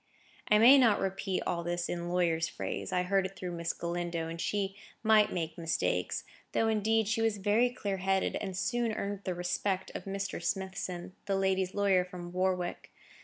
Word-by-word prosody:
I 210 - +6
may 250 +6 +8
not 230 -5 +5
repeat 195 0 -1
all 170 -1 -1
this 175 0 -2
in 175 0 -3
lawyer's 170 -2 +1
phrase; - - -4
I 180 - +1
heard 190 +1 +2
it 195 - -16
through 185 -1 -5
Miss 170 -1 -2
Galindo, 170 -1 -3
and 165 0 -5
she 195 -1 -1 0.3
might 215 -1 +5
make 165 -2 -3
mistakes. 165 -1 -1 0.3
Though, 225 - +2
indeed, 220 0 +2
she 220 +2 0
was 225 -2 +1
very 210 +5 +3
clear 205 -5 -3
headed, 190 +1 +1
and 190 -3 -4
soon 240 +2 0
earned 200 -1 -3
the 185 -2 -1
respect 185 +2 -1
of - - -6
Mr. 195 0 -3
Smithson, 185 -1 -3 0.2
my 195 - +2
lady's 190 -1 +1
lawyer 195 -3 +3
from 180 -1 -8
Warwick. 180 -1 -1
190 Hz, 180 wpm, -31 LUFS, 175-205 Hz, 0.3 s, may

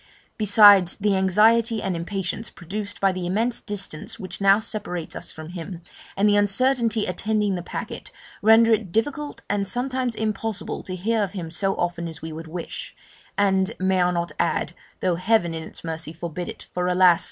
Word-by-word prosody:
Besides, 205 -4 +6
the 205 -1 +1
anxiety 220 +4 +4
and 190 -3 -2
impatience 190 +5 -3
produced 200 +4 -6
by 195 -1 +3
the 185 -1 -3
immense 225 +6 0
distance 195 -7 -4
which 185 -1 -7
now 195 0 +6
separates 205 -6 -4
us - - -5
from 155 0 -9
him, 175 0 -7 0.3
and 200 +2 +4
the 205 - +4
uncertainty 230 +2 +2
attending 210 +2 0
the 180 - -2
packet, - - -7 0.3
render 225 +2 +6
it 215 -5 -1
difficult 290 - -2
and 200 -1 0
sometimes 250 +2 -1
impossible 215 -1 -3
to 185 - -6
hear 220 +5 0
of 200 -2 -2
him 170 -5 -5
so 195 +3 0
often 175 -1 -2
as 160 - -8
we 160 0 -7
would 160 +1 -8
wish 170 +1 -7 0.4
and, 195 +1 +2
may 190 0 +2
I 180 - +3
not 170 -2 -2
add 170 - 0 0.3
(though 180 -2 +1
Heaven 185 -2 +2
in 160 - -4
its 160 - -10
mercy 160 -1 -5
forbid 170 +1 -5
it - - -8
for 180 0 -1
alas! 180 -1 +5
195 Hz, 180 wpm, -24 LUFS, 175-215 Hz, 0.4 s, Besides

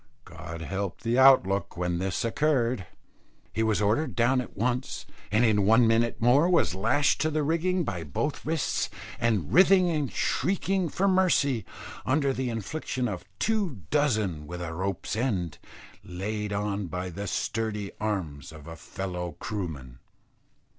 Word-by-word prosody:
God 80 0 -8
help 95 +2 -4
the 120 +2 +1
out 135 -5 +8
look 95 -1 -2
when 90 -1 -1
this 95 +5 -1
occurred. 120 -5 +1 0.7
He 110 - -1
was 110 -1 +1
ordered 115 +10 +1
down 125 +2 +3
at 125 - -10
once, 125 +4 -2 0.3
and 110 +3 +4
in 105 -3 +3
one 115 +4 +5
minute 115 +1 +2
more 135 +9 +4
was 175 - +3
lashed 130 +10 +2
to 155 - +2
the 155 -1 0
rigging 170 +4 +1
by 90 - -3
both 80 - -3
wrists, 160 -2 -1 0.3
and 105 -9 0
writhing 185 -1 +6
and 150 -5 -1
shrieking 190 +2 0
for 195 +6 0
mercy 175 - +2 0.4
under 140 +1 +1
the 130 -1 -2
infliction 125 +3 -3
of 90 -5 -5
two 200 - -1
dozen 110 - +1
with 90 +2 -6
a 85 -2 -4
rope's 95 +4 -3
end, 100 - -1 0.4
laid 105 +3 -4
on 100 -1 -2
by 90 +2 -4
the 100 +4 -5
sturdy 105 -3 -2
arms 85 -11 -3
of 80 -2 -12
a 80 0 -8
fellow 90 -1 -5
Krooman. 75 - -5
110 Hz, 155 wpm, -27 LUFS, 95-140 Hz, 0.7 s, out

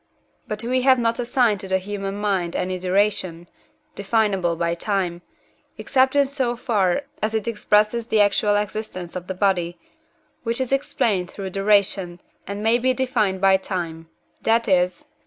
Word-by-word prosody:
But 215 +1 -4
we 255 +2 +1
have 260 0 +5
not 230 -1 0
assigned 240 -3 +2
to 195 - -6
the 190 0 +2
human 195 0 -5
mind 195 -4 -1
any 185 0 -2
duration, 185 -2 0 0.5
definable 200 - 0
by 170 0 -1
time, 175 -1 -2 0.6
except 265 0 +2
in 285 -1 +5
so 265 -3 -1
far 215 -1 0 0.2
as 220 +1 -1
it 220 0 -2
expresses 215 +1 +1
the 220 - +2
actual 205 0 +3
existence 205 -4 -4
of 180 0 -6
the 190 - -4
body, 180 -3 0 0.6
which 230 +1 -2
is 260 -1 -2
explained 230 -10 0
through 195 -2 -6
duration, 195 -3 +1 0.3
and 200 +2 -5
may 230 +2 +3
be 255 +1 +1
defined 220 -8 0
by 195 -1 +5
time 165 -4 -5 0.3
that 230 +1 +2
is 180 -2 +1
(II. - - -34
205 Hz, 160 wpm, -22 LUFS, 185-230 Hz, 0.6 s, have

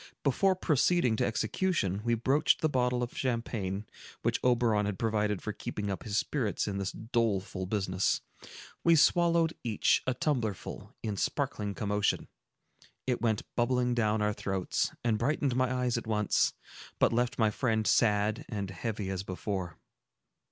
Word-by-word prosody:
Before 190 +8 +3
proceeding 155 -6 +2
to - - +2
execution, 110 - 0
we 120 0 +2
broached 135 +6 +2
the 155 - +3
bottle 125 -3 +1
of 120 - -5
champagne, 110 -6 -2 0.4
which - - +1
Oberon 115 -4 +3
had 100 -2 -3
provided 105 -3 0
for 105 - -3
keeping 105 0 -4
up 95 - -4
his 105 -2 -2
spirits 115 -6 -1
in 100 -1 -2
this 95 -1 -2
doleful 105 -5 -1
business. 95 -2 0 0.6
We 170 0 +6
swallowed 170 +1 +4
each 110 -4 +2
a 130 - +1
tumblerful, 120 - -2
in 105 -3 -2
sparkling 100 +1 -1
commotion; 105 -1 0 0.8
it 125 -2 -1
went 110 -3 +1
bubbling 125 0 +2
down 110 -2 +1
our 105 0 +1
throats, 95 -2 -1
and 110 -3 +1
brightened 135 +1 +1
my 130 0 +2
eyes 125 -2 0
at 115 - -11
once, 105 -2 +2 0.4
but - - +3
left 120 +1 0
my 110 -2 +3
friend 110 -2 0
sad 105 -1 +2
and 100 -4 -3
heavy 100 0 -3
as 95 -1 -2
before. 95 -2 -4
110 Hz, 150 wpm, -30 LUFS, 105-125 Hz, 0.8 s, We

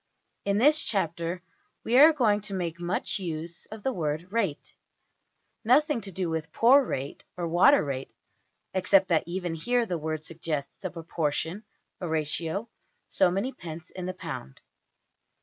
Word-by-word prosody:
In 200 0 +2
this 295 +7 +5
chapter 170 -3 -2 0.4
we 235 - 0
are 310 +3 +10
going 220 -9 +2
to 200 -1 -5
make 170 -2 -3
much 175 +4 -2
use 170 -1 -5
of 215 -1 -10
the 265 - 0
word 155 -5 -1
\emph{rate}. 200 -10 -2 0.9
Nothing 265 +2 +3
to 195 - -6
do 185 0 -2
with 160 -1 -3
poor 265 +5 +6
rate, 140 - -4
or 175 -1 -2
water 180 - +5
rate 135 -2 -4 0.6
(except 190 +1 +4
that 165 -3 +4
even 175 -1 -3
here 240 +9 +1
the 175 -6 -2
word 155 0 -3
suggests 155 -3 -4
a 185 - -1
proportion 165 +3 -3 0.3
a 180 - -4
ratio 160 +6 -1 0.4
so - - +4
many 195 +9 -1
pence 170 -4 -9
in 185 -1 -6
the 185 - -3
pound). 65 - -7
180 Hz, 155 wpm, -28 LUFS, 160-210 Hz, 0.9 s, are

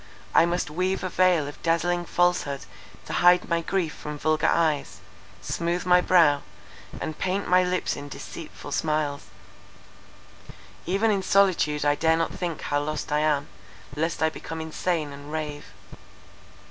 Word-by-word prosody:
I 165 - +6
must 175 -3 -2
weave 185 +4 -1
a 185 - -1
veil 180 -5 +3
of 145 - -10
dazzling 175 +1 +1
falsehood 175 -6 +1 0.4
to - - -6
hide 180 0 +5
my 170 -1 +1
grief 170 -2 -1
from 150 0 -7
vulgar 155 +1 +1
eyes, 155 -4 +1 0.5
smoothe 170 +1 -2
my 180 0 +5
brow, 160 -6 +4 0.6
and 155 - -5
paint 190 +2 -1
my 180 0 +5
lips 180 0 -1
in 145 0 -8
deceitful - - -9
smiles—even 155 +6 -5
in 200 -2 +1
solitude 180 -7 +2
I 145 - +4
dare 160 +2 +2
not 165 - -1
think 175 -3 -4
how 145 0 0
lost 155 +1 -4
I 150 - +2
am, 150 -2 +1 0.5
lest 160 +2 -1
I 160 - +3
become 165 +1 -7
insane 160 -1 -2
and 145 +1 -10
rave." 150 -2 -4
165 Hz, 145 wpm, -25 LUFS, 150-180 Hz, 0.6 s, I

